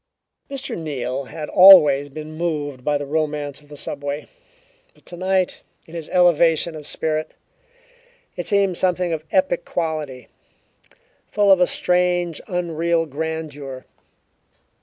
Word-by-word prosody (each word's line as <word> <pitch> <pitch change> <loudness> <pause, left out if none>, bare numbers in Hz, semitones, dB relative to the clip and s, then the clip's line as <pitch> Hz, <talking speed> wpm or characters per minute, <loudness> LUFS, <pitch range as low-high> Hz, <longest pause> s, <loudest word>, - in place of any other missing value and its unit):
Mr. 275 0 -5
Neal 135 -4 -4
had 150 +2 -7
always 150 -8 +8
been 155 +2 -8
moved 150 -6 -3
by 145 +1 +1
the 145 - -5
romance 150 -1 -2
of 145 - -22
the 145 - -10
subway, 145 +1 -5 0.7
but - - -26
tonight, 185 +1 -1 0.2
in 165 - -16
his 165 -2 -7
elevation 170 -2 +3
of 150 -1 -8
spirit, 155 0 -3 1.0
it - - -5
seemed 200 -4 +2
something 180 -2 0
of 155 -1 -4
epic 185 -2 +1
quality, 155 -6 -4 1.0
full 205 -1 +3
of 190 - +6
a 180 - +4
strange, 180 -2 0
unreal 170 -1 0
grandeur. 150 -3 -6
160 Hz, 125 wpm, -21 LUFS, 145-180 Hz, 1.0 s, always